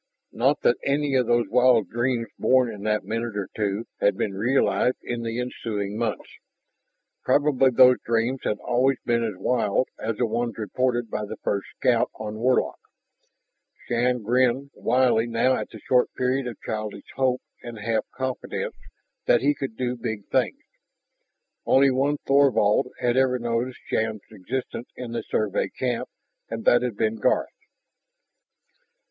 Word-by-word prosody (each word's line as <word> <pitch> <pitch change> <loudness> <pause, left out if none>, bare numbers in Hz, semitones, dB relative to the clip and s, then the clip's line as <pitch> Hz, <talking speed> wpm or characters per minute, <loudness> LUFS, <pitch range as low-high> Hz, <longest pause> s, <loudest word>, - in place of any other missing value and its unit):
Not 135 +5 +1
that 120 - +3
any 140 0 0
of 125 -3 +2
those 120 0 +2
wild 125 -3 +4
dreams 120 0 0
born 130 -2 +3
in 105 - -9
that 105 0 +1
minute 115 -1 -3
or 100 - -3
two 105 +1 -1
had 100 -1 +2
been 100 - -1
realized 125 +4 +1
in 120 -1 -3
the 115 +1 -3
ensuing 105 -5 -3
months. 115 -1 -2 1.0
Probably 145 -2 +3
those 125 0 +6
dreams 115 +3 0
had 105 - -1
always 125 +3 +1
been 115 -1 +1
as 110 -4 -2
wild 115 +3 +1
as 110 -1 -3
the 125 - +2
ones 120 0 -2
reported 120 +1 -1
by 105 - -2
the - - -7
first 100 -1 -1
scout 120 -2 +2
on 110 0 -6
Warlock. 125 +2 +1 1.1
Shann 120 0 0
grinned 130 +4 +1
wryly 120 -1 +2
now 120 +3 +2
at - - -4
the - - -11
short 125 -1 +2
period 130 +1 0
of 120 - -7
childish 110 -1 -4
hope 130 -1 +1 0.2
and 120 -1 -8
half 110 +1 -1
confidence 130 -1 -4 0.5
that 120 - +5
he 145 +2 +3
could 135 -6 -6
do 125 -1 -1
big 110 -4 -5
things. - - 0 1.0
Only 135 0 +4
one 140 +3 +1
Thorvald 135 -7 +4
had 120 0 +1
ever 130 -1 +3
noticed 120 +1 -2
Shann's 110 -1 -1
existence 115 +4 -5
in 125 -2 -7
the 115 0 -2
Survey 105 -2 -1
camp, 125 -2 -3 0.4
and 115 0 -5
that 120 - +5
had 125 -4 -3
been 110 0 0
Garth. 105 - +1
120 Hz, 155 wpm, -25 LUFS, 110-130 Hz, 1.1 s, those